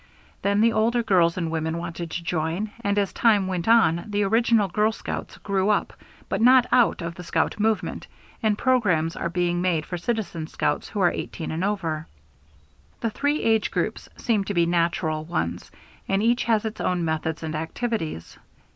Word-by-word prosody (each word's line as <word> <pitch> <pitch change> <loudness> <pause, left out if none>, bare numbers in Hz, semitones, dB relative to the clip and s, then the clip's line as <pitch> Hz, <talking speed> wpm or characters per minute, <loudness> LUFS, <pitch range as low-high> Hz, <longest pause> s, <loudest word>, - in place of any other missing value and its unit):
Then 200 +1 +2
the 230 0 +4
older 230 +2 +2
girls 175 -5 +3
and 165 -3 -2
women 160 0 -2
wanted 170 0 -5
to 170 - -5
join, 170 +5 -2
and 200 -1 0
as 200 -2 0
time 210 -4 +3
went 185 -1 -3
on 220 -8 +4
the 205 -1 0
original 225 0 +3
girl 210 +4 +1
scouts - - -6
grew 195 0 0
up 210 - +1 0.3
but - - -2
not 250 +1 +6
out 240 -7 +3
of 170 0 -4
the 180 - -9
scout 165 +3 -1
movement, 220 0 -1 0.3
and 215 -2 +1
programs 185 -12 +2
are 170 - -2
being 175 0 0
made 170 -4 0
for 175 - -5
Citizen 190 -6 -3
Scouts - - -2
who 210 - -4
are 175 - +4
18 165 - -5
and 160 +3 -2
over. 165 -6 -2 0.9
The 230 - -1
three 290 +6 0
age 220 -1 +2
groups - - -3
seem 220 -4 +1
to 200 - -3
be 170 -1 +4
natural 170 -2 0
ones, 170 +2 -3 0.4
and 195 +1 +1
each 235 +2 +2
has 225 -2 +2
its 220 0 -4
own 180 -2 0
methods 160 0 -2
and 160 -1 -3
activities. 160 - -3
190 Hz, 180 wpm, -24 LUFS, 165-220 Hz, 0.9 s, not